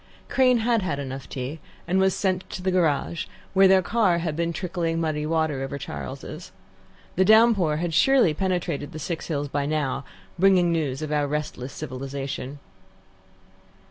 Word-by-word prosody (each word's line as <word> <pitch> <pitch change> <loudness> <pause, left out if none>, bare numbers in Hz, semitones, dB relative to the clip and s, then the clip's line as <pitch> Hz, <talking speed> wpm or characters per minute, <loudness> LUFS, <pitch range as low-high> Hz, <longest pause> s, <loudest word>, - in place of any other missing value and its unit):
Crane 255 -2 +4
had 230 0 +2
had 160 -7 -2
enough 135 -1 -6
tea, 135 +5 -5 0.3
and 185 +2 +2
was 190 -1 +3
sent 190 -2 -1
to 180 - -6
the 190 - +1
garage, 170 -2 0 0.3
where 195 0 +6
their 190 0 +5
car 200 -4 +2
had 165 -3 -2
been 170 +1 0
trickling 170 -2 -2
muddy 155 -2 -1
water 160 -4 0
over 135 +1 -4
Charles's. 70 - -7 0.7
The 190 - +5
downpour 215 -7 +5
had 170 0 -2
surely 255 - +4
penetrated 175 -4 -2
the - - -6
Six 160 +2 -4
Hills 145 -3 -2
by 140 0 -2
now, 145 -3 -1 0.4
bringing 185 -2 +5
news 155 -4 -1
of 155 - -4
our 145 -1 +1
restless 145 -3 -4
civilization. 135 0 -5
165 Hz, 160 wpm, -25 LUFS, 145-185 Hz, 0.7 s, where